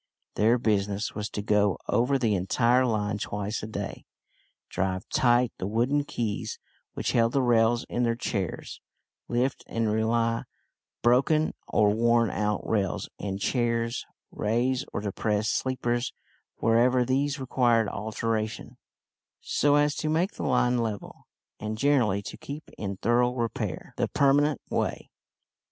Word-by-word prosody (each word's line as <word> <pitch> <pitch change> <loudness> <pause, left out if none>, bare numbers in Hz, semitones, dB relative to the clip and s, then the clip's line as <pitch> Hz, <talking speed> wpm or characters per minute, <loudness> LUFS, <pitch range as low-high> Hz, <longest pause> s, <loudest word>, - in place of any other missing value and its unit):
Their 115 +3 +3
business 105 -2 0
was 105 0 -4
to 105 - -4
go 105 -2 +2
over 125 +4 +2
the 115 -5 +1
entire 120 +7 +2
line 105 -3 -1
twice 105 +1 -3
a 105 - -5
day, 100 -2 -5 0.6
drive 95 -1 -2
tight 120 -1 +3
the 95 - -2
wooden 125 +7 +1
"keys" 110 -7 -3 0.4
which - - -1
held 115 0 +2
the 140 - +3
rails 120 -1 +3
in 120 - -2
their 115 -1 +2
chairs, 100 -6 -4 0.5
lift 125 +2 0
and 115 -2 0
re 110 +1 +1
lay 115 0 +1 0.6
broken 135 +6 +3
or 105 -1 +3
worn 115 -1 +3
out 105 +1 -1
rails 100 -4 -1
and 100 -1 -3
chairs, 115 +1 0 0.2
raise 125 +5 0
or - - -3
depress 105 +1 -1
sleepers 120 -1 -1 0.4
wherever 120 +2 +3
these 140 +3 0
required 120 -4 +2
alteration, 110 +1 -3 0.6
so 145 0 +2
as 145 0 +3
to 155 - -1
make 170 +5 +1
the - - -9
line 125 0 +2
level, 110 -3 -5 0.3
and, 110 0 -4
generally, 115 -7 +2
to - - -7
keep 145 +2 -8
in 100 -2 -4
thorough 120 +4 +2
repair 115 -3 -3
the - - +1
"permanent 145 0 +3
way." - - -2
115 Hz, 140 wpm, -27 LUFS, 105-125 Hz, 0.6 s, Their